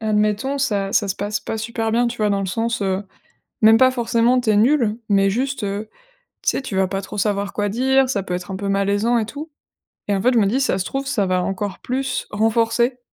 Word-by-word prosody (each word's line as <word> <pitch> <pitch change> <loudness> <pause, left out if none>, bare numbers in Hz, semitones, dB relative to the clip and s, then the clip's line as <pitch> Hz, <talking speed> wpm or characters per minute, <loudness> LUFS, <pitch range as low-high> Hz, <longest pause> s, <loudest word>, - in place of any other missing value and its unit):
admettons, 215 +5 0
ça 200 -7 -1
ça 205 -3 +2
se 190 - -1
passe 205 0 -2
pas 220 - -4
super 225 0 -3
bien, 240 +2 +2
tu 235 0 -4
vois, 210 -1 +2
dans 200 0 +1
le 195 - -2
sens, 230 +3 -2
heu, 190 +1 -1 0.6
même 220 +1 +7
pas 260 0 +5
forcément, 240 +1 +2
tu 235 - 0
es 210 - +3
nulle. 230 -1 +3
Mais 195 -1 +3
juste, 260 +2 -2
heu, 205 +2 -3 0.5
tu - - +3
sais, - - -3
tu 205 -7 -5
vas 190 0 +3
pas 195 +1 -3
trop 210 +2 -8
savoir 200 -1 0
quoi 205 -1 -1
dire, 265 +4 +2
ça 200 -7 -1
peut 180 -1 -4
être 180 +2 -5
un - - -3
peu 200 0 -4
malaisant 200 +4 +1
et 215 - -1
tout. 295 +7 -8 0.6
Et 200 - +1
en 190 - -1
fait, 250 +3 +3
je 235 - +4
me 200 - +3
dis, 260 +7 +1
ça 195 - +1
se 185 - -2
trouve, 275 0 -3
ça 260 -8 0
va 185 -1 0
encore 195 0 -3
plus 255 0 -3
renforcer, 230 +3 +1
215 Hz, 245 wpm, -21 LUFS, 200-245 Hz, 0.6 s, même